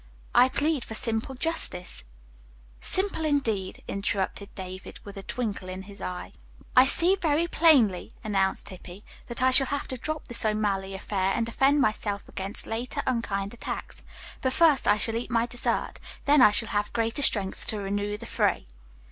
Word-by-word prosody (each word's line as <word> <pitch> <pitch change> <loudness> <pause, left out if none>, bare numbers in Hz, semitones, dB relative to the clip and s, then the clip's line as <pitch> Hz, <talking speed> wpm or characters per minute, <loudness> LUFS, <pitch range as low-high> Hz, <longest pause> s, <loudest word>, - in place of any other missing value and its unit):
"I 250 +1 +6
plead 295 -1 0
for 220 - -7
simple 230 +4 0
justice." 180 - 0 0.7
"Simple, 380 -4 +2
indeed," 225 -11 -1
interrupted 200 0 -2
David 185 -1 -8
with 200 0 -10
a 195 - -7
twinkle 205 -4 -4
in 185 +1 -6
his 200 0 -13
eye. 90 0 -6 0.4
"I 255 +1 +7
see 350 +7 +6
very 325 -2 +1
plainly," 275 - +3
announced 195 -2 0
Hippy, 185 +1 -11 0.2
"that 235 +1 -2
I 260 - +5
shall 265 +1 +7
have 285 +2 -3
to 260 - -3
drop 310 +5 -5
this 240 - +1
O'Malley 205 -3 -1
affair 195 0 -1
and 230 - 0
defend 270 +5 +2
myself 210 -2 -1
against 195 +1 -4
later 230 +3 -3
unkind 200 -5 -2
attacks. 235 - -7 0.4
But 260 -1 0
first 315 -4 +4
I 205 - +5
shall 225 +1 +1
eat 235 - -5
my 230 -1 +1
dessert, 245 0 -2 0.3
then 290 -1 +5
I 230 - +8
shall 215 +2 0
have 205 0 -1
greater 230 +4 -1
strength 200 -8 +1
to 215 - -2
renew 205 +1 -3
the 235 - -9
fray." - - 0
220 Hz, 170 wpm, -26 LUFS, 195-260 Hz, 0.7 s, I